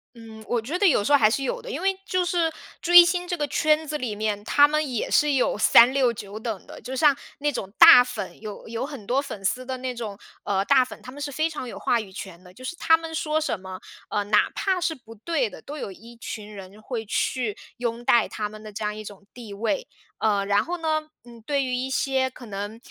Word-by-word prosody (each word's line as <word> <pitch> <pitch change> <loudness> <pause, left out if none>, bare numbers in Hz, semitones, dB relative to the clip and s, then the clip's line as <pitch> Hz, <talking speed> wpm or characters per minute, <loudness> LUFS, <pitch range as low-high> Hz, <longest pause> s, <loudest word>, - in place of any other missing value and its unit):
嗯， 225 -1 -12
我 240 - 0
觉 265 +10 -3
得 405 - +5
有 265 - +3
时 285 - -1
候 285 - +8
还 215 - +5
是 270 +5 -1
有 - - -2
的， - - -9
因 480 - -4
为 390 0 +2
就 365 -1 0
是 340 -2 +1 0.3
追 350 0 +9
星 355 +1 -1
这 355 -1 -2
个 295 - -1
圈 310 +2 +1
子 300 - -4
里 250 -8 -3
面， 210 -1 -2
他 290 +6 +5
们 305 -2 -1
也 240 - -2
是 295 -1 +3
有 260 - +2
三 235 +4 +6
六 260 -3 +3
九 205 -1 -8
等 220 -4 -5
的。 - - -11
就 255 +4 -6
像 290 +1 +4 0.2
那 295 +1 0
种 195 -7 -5
大 245 - +10
粉， 245 -5 -7
有 210 -2 -8
有 230 +3 -3
很 275 -9 -9
多 255 +6 +1
粉 210 -8 -8
丝 255 +6 0
的 260 0 -5
那 255 0 -4
种， 220 -4 -6 0.3
呃， 195 -1 0
大 265 +1 +5
粉， 250 - -10
他 255 - -9
们 290 - -10
是 285 0 -3
非 310 +4 0
常 300 -5 -6
有 - - -8
话 235 - +1
语 195 -3 -11
权 185 -2 -9
的， 180 - -15
就 255 +8 -12
是 345 - -4
他 325 -1 +4
们 325 0 -8
说 310 -1 0
什 315 -10 -2
么， 185 0 -8 0.3
呃， 205 - 0
哪 210 +1 +3
怕 380 -2 0
是 335 -2 0
不 225 -4 -14
对 255 +3 -1
的， - - -11
都 295 +2 -8
有 205 - -5
一 230 +5 -14
群 215 -2 -7
人 200 +1 -11
会 225 -1 -5
去 220 +1 -1 0.2
拥 235 -1 -3
戴 235 -1 +4
他 210 -1 -4
们 215 0 -12
的 215 -1 -10
这 215 - -5
样 210 0 -1
一 215 - -7
种 200 -1 -11
地 230 -4 -10
位。 230 - -2 0.3
呃， 205 -2 +1
然 205 +1 +2
后 350 - -3
呢， 310 -1 -1 0.2
嗯， 235 -1 -14
对 280 0 0
于 255 -1 -3
一 255 +1 -2
些， 265 0 0
可 255 -1 -13
能， 205 +2 -5
250 Hz, 270 characters per minute, -24 LUFS, 215-295 Hz, 0.3 s, 大